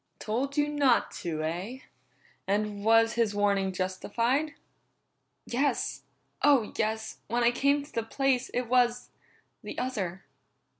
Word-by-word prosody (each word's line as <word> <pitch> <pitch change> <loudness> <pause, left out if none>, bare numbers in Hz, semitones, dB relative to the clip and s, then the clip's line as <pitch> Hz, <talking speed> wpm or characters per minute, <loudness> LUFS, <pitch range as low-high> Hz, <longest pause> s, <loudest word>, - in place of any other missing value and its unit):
"Told 265 +6 -2
you 295 0 +3
not 285 -5 +2
to, 155 -3 -3
eh? 185 - -4 0.7
And 205 0 -1
was 225 +1 +5
his 230 -3 +1
warning 200 -2 +2
justified?" 230 - -1 0.9
"Yes. 275 +4 -1 0.4
Oh, 275 -7 +4
yes! 220 0 -2
When 235 +2 0
I 235 - +5
came 280 +3 +2
to 290 - -16
the 230 - 0
place, 260 +2 0
it 250 - -1
was 245 0 +2 0.5
the - - -8
other." 195 -8 -3
230 Hz, 130 wpm, -29 LUFS, 205-260 Hz, 0.9 s, was